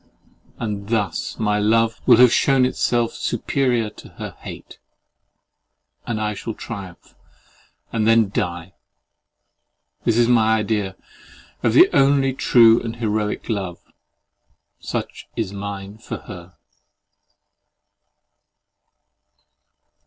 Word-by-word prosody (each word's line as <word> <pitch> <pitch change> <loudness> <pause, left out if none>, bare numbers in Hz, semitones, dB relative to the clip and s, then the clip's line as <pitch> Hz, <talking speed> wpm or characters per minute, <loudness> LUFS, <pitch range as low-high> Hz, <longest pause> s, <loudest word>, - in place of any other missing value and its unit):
And 105 -2 -5
thus 105 -7 -2
my 105 -1 0
love 115 +2 +2
will 120 -3 +8
have 125 0 +6
shewn 135 -2 +3
itself 120 -2 0
superior 120 -2 -1
to - - -14
her - - -6
hate; - - -10 1.3
and 115 -3 -2
I 105 0 -1
shall 110 +2 -6
triumph 100 -6 -9 0.8
and 110 -1 +1
then 115 -2 +4
die. 90 -3 -3 1.3
This 115 - +1
is 120 -1 +4
my 110 -2 +4
idea 105 -3 -2 0.7
of - - +1
the - - +8
only 135 -1 +3
true 115 -3 +5
and 115 -1 -5
heroic 105 -2 -2
love! 95 -6 -3 1.0
Such - - -5
is 105 -4 -3
mine 100 +1 -7
for - - -6
her. 90 -1 -11
110 Hz, 105 wpm, -21 LUFS, 100-120 Hz, 1.3 s, will